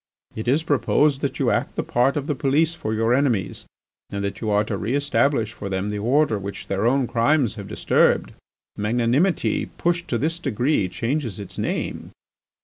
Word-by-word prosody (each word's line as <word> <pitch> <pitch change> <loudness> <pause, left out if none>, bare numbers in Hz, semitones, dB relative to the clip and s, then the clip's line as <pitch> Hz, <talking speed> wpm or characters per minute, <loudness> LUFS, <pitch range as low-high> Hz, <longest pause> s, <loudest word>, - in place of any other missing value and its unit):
"It 110 +2 -5
is 145 +6 +2
proposed 145 -1 +2
that 140 - -2
you - - +2
act - - -1
the - - -1
part 125 +4 +1
of 145 - -2
the 150 - 0
police 145 +5 +1
for 110 -10 -4
your 115 +2 +1
enemies, 125 -8 0 0.4
and 100 0 -4
that 100 - -4
you 110 - -1
are 105 0 +3
to - - -3
re 115 +6 -2
establish 140 -5 +1
for 100 - -6
them 95 +2 -2
the 105 - -3
order 125 0 +2
which 100 +1 -7
their 100 +3 0
own 135 +1 +2
crimes 120 +1 +2
have 100 -2 -8
disturbed. - - +2 0.4
Magnanimity 120 - +1
pushed 170 0 0
to 120 - 0
this 165 +6 -1
degree 125 - 0
changes 120 0 -2
its 100 - -8
name. - - -3
120 Hz, 185 wpm, -23 LUFS, 105-145 Hz, 0.4 s, are